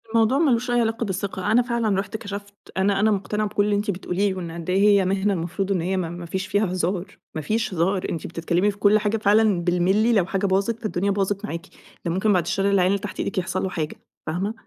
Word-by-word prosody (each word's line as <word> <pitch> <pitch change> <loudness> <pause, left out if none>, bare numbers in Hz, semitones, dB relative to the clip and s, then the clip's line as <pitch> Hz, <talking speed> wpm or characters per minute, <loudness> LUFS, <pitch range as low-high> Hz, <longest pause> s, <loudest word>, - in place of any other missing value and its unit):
الموضوع 230 +3 +3
ما 305 -2 +3
لوش 245 +1 0
أي 240 0 +3
علاقة 225 0 0
بالثقة، 190 0 -2
أنا 235 +3 +5
فعلًا 235 -5 0
رُحت 200 +2 -4
كشفت، 200 -1 -7 0.2
أنا 195 +1 +2
أنا 215 +2 +3
مقتنعة 210 +1 -1
بكل 205 0 +1
اللي 210 0 +1
أنتِ 205 +1 0
بتقوليه 190 +1 -1
وإن 175 -3 -5
قد 170 +1 -7
إيه 185 +1 +2 0.2
هي 190 - +1
مهنة 195 +2 +1
المفروض 185 +3 -2
إن 185 -3 +1
هي 185 +3 -1
م - - +1
ما 175 0 -5
فيش 190 +3 -3
فيها 205 +2 +1
هزار، 185 +1 -2 0.2
ما 155 - -2
فيش 215 +6 -1
هزار، 185 +3 0
أنتِ 165 - -4
بتتكلمي 175 +4 0
في 200 - -15
كل 205 +1 +4
حاجة 210 +1 0
فعلًا 210 -3 +3
بالمللي، 190 +6 +2
لو 200 -5 +3
حاجة 195 +2 -1
باظت 200 +4 +1
فالدُّنيا، 200 -3 -1
باظت 200 0 -1
معاكِ، 165 +4 -5 0.4
ده 170 - 0
ممكن 190 +4 +2
بعد 180 -2 +2
الشّر 195 +4 0
العيان 185 -2 +4
اللي 200 - +1
تحت 195 -1 -7
إيدِك - - -3
يحصل 185 0 -1
له 190 - -1
حاجة، 160 -4 -3 0.3
فاهمة؟ 180 +7 -2
195 Hz, 235 wpm, -23 LUFS, 180-210 Hz, 0.4 s, أنا